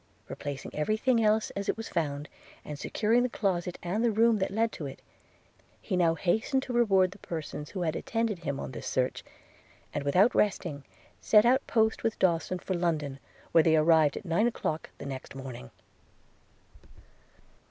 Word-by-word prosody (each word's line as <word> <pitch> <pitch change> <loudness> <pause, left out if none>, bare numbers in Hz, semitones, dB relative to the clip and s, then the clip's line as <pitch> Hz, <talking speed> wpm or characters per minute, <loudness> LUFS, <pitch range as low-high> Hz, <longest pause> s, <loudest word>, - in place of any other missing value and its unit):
Replacing 145 -2 -6
every 185 +9 0
thing 240 -1 +2
else 215 0 +2
as 200 0 -4
it - - 0
was 225 - -5
found, 145 -3 -2 0.4
and 150 -1 -7
securing 225 +9 +1
the 250 - +1
closet 180 -5 -1
and 190 +6 -1
the 240 - +4
room 225 0 +3
that 190 - 0
led 225 +3 0
to 150 - -6
it, 135 - -9 0.8
he - - -3
now 170 -2 +3
hastened 220 - 0
to 250 - -5
reward 195 -6 +4
the 200 - -13
persons 155 -4 -6
who 185 -3 -3
had 160 -1 -1
attended 225 -4 -1
him 140 -5 -3
on - - -5
this 120 - -7
search 130 -1 -1 0.3
– - - -30
and 145 - -2
without 180 +11 +4
resting, 170 -8 0 0.4
set 210 0 +5
out 260 +3 +3
post 220 -1 +2
with 225 - 0
Dawson 185 0 +1
for 185 - -4
London, 155 -6 -1 0.3
where 165 - +6
they 160 -1 +4
arrived 155 -1 +4
at - - -8
nine 175 +7 +2
o'clock 160 -9 -3
the - - -8
next 135 -1 -7
morning. 130 - -8
180 Hz, 180 wpm, -29 LUFS, 150-220 Hz, 0.8 s, where